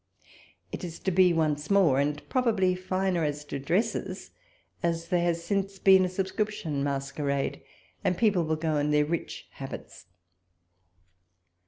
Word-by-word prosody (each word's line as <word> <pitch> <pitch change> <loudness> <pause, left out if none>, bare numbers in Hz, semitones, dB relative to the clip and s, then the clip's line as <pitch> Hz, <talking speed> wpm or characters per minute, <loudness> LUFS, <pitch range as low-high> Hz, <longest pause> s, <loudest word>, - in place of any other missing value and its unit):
It - - -6
is 170 -2 -6
to 190 - 0
be 180 0 +5
once 155 -3 0
more, 185 -10 +4
and 145 +1 -1
probably 220 -8 +2
finer 185 -1 -1
as 150 0 -2
to 140 - -5
dresses, 190 - -1 0.5
as 165 -1 -1
there 180 -2 +2
has 170 -1 0
since 195 +2 -1
been 190 -1 +6
a - - -2
subscription 190 -5 -2
masquerade, 140 0 -2 0.4
and 180 - +1
people 210 -6 +3
will 160 0 0
go 155 -1 -1
in 145 0 +1
their 150 0 +3
rich 165 +2 -4
habits. - - -9
170 Hz, 145 wpm, -28 LUFS, 150-190 Hz, 0.5 s, been